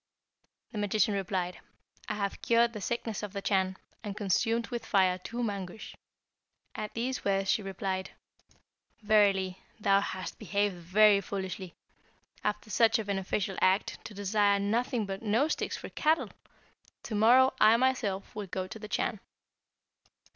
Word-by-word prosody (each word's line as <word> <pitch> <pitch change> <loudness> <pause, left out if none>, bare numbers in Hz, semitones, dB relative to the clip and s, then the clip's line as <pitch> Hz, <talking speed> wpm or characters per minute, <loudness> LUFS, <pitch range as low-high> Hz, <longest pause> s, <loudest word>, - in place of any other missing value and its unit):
The 215 - -4
magician 205 +1 +2
replied, 185 -2 -2 0.5
'I 210 - -1
have 200 -1 -3
cured 235 0 +3
the 210 - -6
sickness 225 0 -3
of 210 -2 -6
the 200 - -4
Chan, 190 -2 +1 0.3
and 205 -2 -5
consumed 225 +4 +1
with 240 -2 -4
fire 185 -2 +2
two 235 +6 -4
Mangusch.' 200 -2 -5 0.8
At 210 - -6
these 250 +3 -2
words 195 -1 +1
she - - +1
replied, 190 -1 -3 0.9
'Verily, 195 -3 +3 0.2
thou 195 -1 +4
hast 185 -2 -5
behaved 205 -1 0
very 200 +4 +4
foolishly. 190 -2 -5 0.7
After 210 +1 -2
such 225 0 +4
a 220 - -3
beneficial 195 0 -2
act, 190 +2 +1
to 210 - -8
desire 200 0 +2
nothing 225 +3 0
but 195 0 -5
nose 230 +8 +1
sticks - - -3
for - - -8
cattle! 315 +1 +1 0.7
To 230 - -6
morrow 245 +5 +5
I 220 +2 +7
myself 240 -7 0
will 205 -2 -5
go 185 +1 -3
to 220 - -8
the 210 - -7
Chan.' 215 0 -1
205 Hz, 145 wpm, -30 LUFS, 195-220 Hz, 0.9 s, I